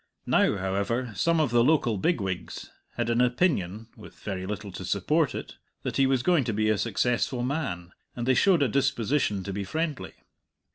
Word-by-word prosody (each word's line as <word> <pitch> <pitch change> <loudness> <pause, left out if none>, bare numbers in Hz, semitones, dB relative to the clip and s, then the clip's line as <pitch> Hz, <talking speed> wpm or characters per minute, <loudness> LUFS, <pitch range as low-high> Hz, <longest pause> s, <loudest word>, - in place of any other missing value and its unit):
Now, - - +3
however, 100 +6 -1
some 165 - +1
of 150 -6 +1
the 120 0 +4
local 120 -7 +2
bigwigs 95 - -2 0.2
had 120 -1 -1
an 115 +1 +2
opinion 120 - +1
(with - - -13
very 95 -2 -5
little 105 0 -5
to 90 - -7
support 125 - +1
it) - - -7 0.3
that - - -3
he 135 -1 +4
was 130 -2 +1
going 175 -4 +3
to 115 - -1
be 110 +1 +1
a 110 - +2
successful 120 +3 0
man, 125 - -3 0.2
and 120 - -3
they 130 - +5
showed 175 +1 +4
a - - +3
disposition 120 -4 0
to 100 - -5
be 100 +1 -3
friendly. 155 - -3
120 Hz, 185 wpm, -27 LUFS, 100-140 Hz, 0.3 s, they